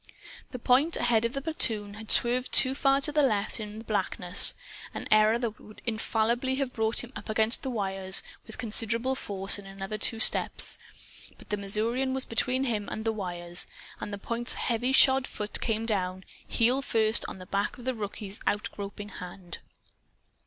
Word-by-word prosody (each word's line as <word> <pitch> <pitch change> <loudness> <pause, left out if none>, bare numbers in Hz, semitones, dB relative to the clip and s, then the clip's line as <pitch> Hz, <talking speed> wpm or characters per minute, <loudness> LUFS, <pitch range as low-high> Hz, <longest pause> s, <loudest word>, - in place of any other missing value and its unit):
The 255 - -7
point, 260 +7 +2
ahead 235 -2 +2
of 235 - -2
the 275 - -5
platoon, 220 -10 +1
had 215 +1 -10
swerved 250 +1 +5
too 260 0 +7
far 275 0 +2
to 300 - 0
the 300 0 +2
left, 220 -5 0
in 210 0 -7
the 225 - -8
blackness 190 -3 +3 0.4
an - - -6
error 215 +1 +5
that 235 -3 -4
would 215 - -15
infallibly 235 +3 -1
have 270 -2 -3
brought 220 +1 -1
him 245 +2 -11
up - - -9
against 220 +2 +2
the 265 - -4
wires, 195 -4 -1 0.2
with 220 - -9
considerable 230 +2 -1
force, 195 -5 -1
in 195 - -12
another 195 +2 -6
two 225 +1 +1
steps. - - +4 0.6
But - - -17
the 210 - -1
Missourian 230 +6 0
was 265 - +1
between 255 +3 0
him 220 -6 -2
and 220 - -5
the 225 - 0
wires. 175 -4 -4 0.3
And 205 - -6
the 205 - -5
point's 235 +4 0
heavy 245 +2 -1
shod 265 0 +5
foot 210 0 -4
came 225 -1 -1
down, 190 -4 -2 0.2
heel 245 +4 +1
first, 220 -4 +3
on - - -8
the 185 - -11
back 200 +2 -2
of 245 - -12
the 260 - -1
rookie's 205 -2 -7
out 205 +1 -1
groping 205 +1 -8
hand. 180 -2 -8
220 Hz, 185 wpm, -27 LUFS, 205-250 Hz, 0.6 s, too